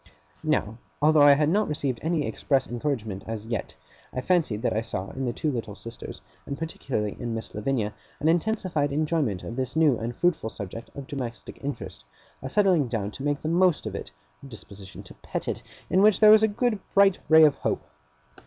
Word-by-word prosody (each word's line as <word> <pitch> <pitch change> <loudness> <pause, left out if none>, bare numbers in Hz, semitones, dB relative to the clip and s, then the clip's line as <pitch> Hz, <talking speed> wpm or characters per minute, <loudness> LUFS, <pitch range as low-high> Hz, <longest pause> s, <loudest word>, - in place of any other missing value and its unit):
Now, 125 -8 0 0.2
although 155 +1 +5
I 145 0 +9
had 150 +1 +2
not 210 +5 +2
received 140 -5 -2
any 160 -2 0
express 135 -3 0
encouragement 120 -6 -3
as 110 -1 -5
yet, 115 +1 -4 0.4
I - - -3
fancied 140 - +1
that - - +1
I 110 - +1
saw 100 -4 -4
in 135 0 -4
the - - 0
two 150 +5 -1
little 115 -5 -4
sisters, 115 +2 -9 0.3
and 140 - -4
particularly 135 -9 -3
in 120 -2 -3
Miss 110 - -6
Lavinia, 105 -1 -1 0.3
an 150 - 0
intensified 170 -4 +1
enjoyment 150 - 0
of 115 - -6
this 130 +2 -2
new 155 -6 +4
and 115 +1 -4
fruitful 170 -9 +1
subject 110 +2 -8
of 140 - -7
domestic 130 -5 -7
interest, 140 0 -5 0.4
a 130 - -5
settling 185 -6 +3
down 110 -4 -2
to 135 - -8
make 145 0 -1
the - - -2
most 175 +1 +3
of - - -4
it, - - -6 0.3
a 140 - -11
disposition 100 -5 -10
to - - -12
pet - - -4
it, - - -2 0.3
in 190 - +3
which 210 0 +5
there 215 -1 +8
was 215 0 +8
a 220 - +5
good 220 +1 0 0.2
bright 200 -1 +5
ray 160 0 +8
of 150 -2 +6
hope. - - -1
140 Hz, 200 wpm, -26 LUFS, 115-160 Hz, 0.4 s, I